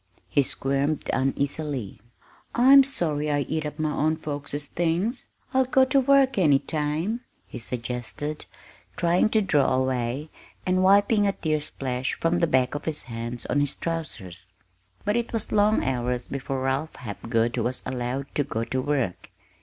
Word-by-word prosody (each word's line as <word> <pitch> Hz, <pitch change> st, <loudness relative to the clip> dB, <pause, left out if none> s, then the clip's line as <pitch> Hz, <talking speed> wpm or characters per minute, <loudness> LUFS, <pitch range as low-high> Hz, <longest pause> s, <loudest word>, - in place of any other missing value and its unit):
He 145 Hz, -, +3 dB
squirmed 140 Hz, +2 st, -1 dB
uneasily. 135 Hz, -3 st, -2 dB, 0.6 s
"I'm 270 Hz, +3 st, +8 dB
sorry 155 Hz, -, 0 dB
I 145 Hz, -1 st, +1 dB
eat 155 Hz, +1 st, -2 dB
up 150 Hz, -, -8 dB
my 155 Hz, -1 st, 0 dB
own 155 Hz, +2 st, +1 dB
folks's 145 Hz, -1 st, -5 dB
things. 175 Hz, -, -1 dB, 0.3 s
I'll 260 Hz, 0 st, +4 dB
go 260 Hz, +1 st, +4 dB
to 260 Hz, +1 st, +3 dB
work 270 Hz, -3 st, +4 dB
any 150 Hz, -6 st, +5 dB
time," 155 Hz, -, -2 dB, 0.2 s
he -, -, -8 dB
suggested, 125 Hz, +5 st, -4 dB, 0.5 s
trying 175 Hz, +4 st, +2 dB
to 220 Hz, -1 st, +2 dB
draw 145 Hz, -8 st, +2 dB
away, 130 Hz, +3 st, -1 dB, 0.3 s
and 185 Hz, 0 st, +2 dB
wiping 205 Hz, +2 st, +4 dB
a 200 Hz, -, +1 dB
tear 155 Hz, -4 st, -1 dB
splash 130 Hz, -3 st, -3 dB
from 170 Hz, +1 st, +1 dB
the 170 Hz, -, +3 dB
back 130 Hz, -4 st, +2 dB
of 145 Hz, -, -5 dB
his 155 Hz, -2 st, -2 dB
hand 115 Hz, +1 st, -5 dB
on 145 Hz, -, +1 dB
his 145 Hz, -1 st, 0 dB
trousers. 105 Hz, -, -5 dB, 0.6 s
But 210 Hz, +3 st, +2 dB
it 235 Hz, 0 st, -2 dB
was 225 Hz, -2 st, 0 dB
long 210 Hz, +1 st, +3 dB
hours 125 Hz, -1 st, -1 dB
before 135 Hz, -1 st, -3 dB
Ralph 135 Hz, +4 st, -1 dB
Hapgood 115 Hz, +1 st, -1 dB
was 120 Hz, +2 st, 0 dB
allowed 125 Hz, +1 st, -3 dB
to 145 Hz, -, +1 dB
"go 115 Hz, -5 st, -3 dB
to 130 Hz, +2 st, -2 dB
work." 130 Hz, -10 st, -2 dB
145 Hz, 160 wpm, -25 LUFS, 130-175 Hz, 0.6 s, I'm